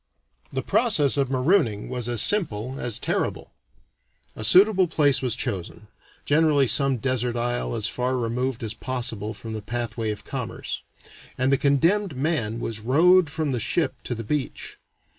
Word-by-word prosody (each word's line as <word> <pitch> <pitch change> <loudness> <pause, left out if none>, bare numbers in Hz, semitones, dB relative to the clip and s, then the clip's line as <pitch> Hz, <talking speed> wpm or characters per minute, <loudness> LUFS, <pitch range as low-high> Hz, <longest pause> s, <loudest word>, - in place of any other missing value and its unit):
The - - -3
process 180 - +3
of 140 -3 0
marooning 130 - +1
was 125 -2 -3
as 120 -3 +3
simple 130 - +1
as 120 -3 -1
terrible. - - -3 0.8
A 110 - -6
suitable 190 - +5
place 145 -4 +2
was 125 -4 0
chosen 105 -1 -5 0.4
(generally 150 -2 +3
some 135 0 +2
desert 125 -1 -1
isle 120 0 -2
as 110 -2 -2
far 125 +2 -1
removed 125 +1 -2
as 110 -1 -3
possible 115 -4 -4
from 110 +2 -8
the 110 - -5
pathway 115 0 -3
of 105 -1 -5
commerce), - - -5 0.6
and 130 +2 +1
the - - +5
condemned 160 +5 +1
man 130 -7 -1
was 115 -2 -4
rowed 165 +9 +4
from 155 -1 -2
the 125 - -1
ship 160 +9 0
to 120 - -3
the 115 - -6
beach. 145 +4 -4
130 Hz, 160 wpm, -24 LUFS, 115-150 Hz, 0.8 s, suitable